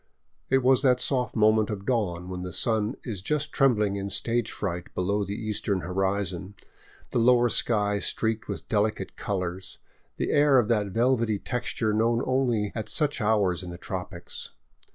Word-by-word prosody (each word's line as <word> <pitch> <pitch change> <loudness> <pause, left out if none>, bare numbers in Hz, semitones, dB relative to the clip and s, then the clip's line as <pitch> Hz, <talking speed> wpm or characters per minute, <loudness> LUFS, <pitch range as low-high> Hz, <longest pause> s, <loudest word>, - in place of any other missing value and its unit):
It 135 0 +3
was 130 0 +5
that 125 -2 +3
soft 125 -4 0
moment 110 0 +3
of 100 -2 -5
dawn 90 -8 -1
when 90 -1 -5
the 90 0 -5
sun 110 +1 0
is 105 -7 -4
just 150 +7 -1
trembling 105 -7 +2
in 100 0 -4
stage 120 +2 +1
fright 90 -3 -4
below 100 +3 0
the 100 +1 -4
eastern 105 -3 -2
hori 95 +3 0
zon, 95 +2 -7 0.6
the - - +1
lower 120 +1 +4
sky 105 -2 +1
streaked 110 +2 -1
with - - -6
delicate 105 0 -1
colors, 95 -2 -4 0.4
the - - -1
air 145 -2 +5
of 120 -4 +2
that 105 -3 +2
velvety 115 +1 +1
texture 115 -2 -2
known 115 +3 +2
only 120 -6 +1
at 110 -2 -4
such 150 -5 0
hours 105 -5 +2
in 90 - -7
the 85 - -7
tropics. 90 0 -6
105 Hz, 170 wpm, -26 LUFS, 100-120 Hz, 0.6 s, was